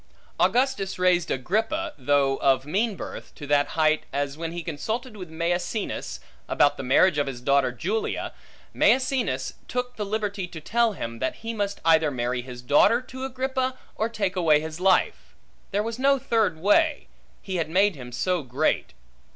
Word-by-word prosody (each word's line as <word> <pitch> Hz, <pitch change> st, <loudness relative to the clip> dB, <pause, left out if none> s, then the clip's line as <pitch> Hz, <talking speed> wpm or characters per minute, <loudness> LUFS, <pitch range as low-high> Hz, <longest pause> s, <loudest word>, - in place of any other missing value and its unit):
Augustus 200 Hz, +2 st, +1 dB
raised 180 Hz, -1 st, +2 dB
Agrippa 225 Hz, -, -1 dB
(though 140 Hz, -2 st, +2 dB
of 135 Hz, -1 st, +2 dB
mean 205 Hz, +8 st, 0 dB
birth) -, -, -8 dB
to 145 Hz, -, -8 dB
that 145 Hz, 0 st, +2 dB
height, 155 Hz, -1 st, +3 dB
as 140 Hz, 0 st, -2 dB
when 165 Hz, +1 st, -4 dB
he 170 Hz, 0 st, -5 dB
consulted 220 Hz, -, -4 dB
with 185 Hz, -5 st, -8 dB
Maecenas, 175 Hz, +5 st, -2 dB, 0.3 s
about 145 Hz, 0 st, +3 dB
the -, -, -6 dB
marriage 145 Hz, +5 st, +4 dB
of 145 Hz, -, 0 dB
his 130 Hz, -3 st, -5 dB
daughter 140 Hz, 0 st, +2 dB
Julia, 195 Hz, -, -2 dB, 0.4 s
Maecenas 255 Hz, -, +1 dB
took 250 Hz, 0 st, -3 dB
the 210 Hz, -, -2 dB
liberty 205 Hz, -2 st, -2 dB
to 170 Hz, -2 st, -9 dB
tell 230 Hz, +7 st, +1 dB
him, 115 Hz, -10 st, -6 dB
that 130 Hz, -, -1 dB
he 230 Hz, -, -2 dB
must 205 Hz, -2 st, -2 dB
either 160 Hz, -2 st, +5 dB
marry 125 Hz, -1 st, -2 dB
his 125 Hz, -1 st, -10 dB
daughter 150 Hz, -, +5 dB
to 260 Hz, +1 st, -7 dB
Agrippa, 260 Hz, 0 st, -2 dB, 0.2 s
or 220 Hz, +2 st, -1 dB
take 200 Hz, -4 st, -2 dB
away 160 Hz, -5 st, +4 dB
his 160 Hz, +1 st, -6 dB
life; 185 Hz, 0 st, +1 dB, 0.3 s
there 205 Hz, +1 st, 0 dB
was 230 Hz, +2 st, -4 dB
no 275 Hz, +1 st, +4 dB
third 220 Hz, -9 st, +1 dB
way, 245 Hz, -, +2 dB, 0.4 s
he 190 Hz, -2 st, -3 dB
had 165 Hz, -2 st, -1 dB
made 195 Hz, +4 st, +3 dB
him 125 Hz, -3 st, -9 dB
so 180 Hz, +7 st, 0 dB
great. 130 Hz, -2 st, -1 dB
180 Hz, 170 wpm, -25 LUFS, 145-225 Hz, 0.4 s, either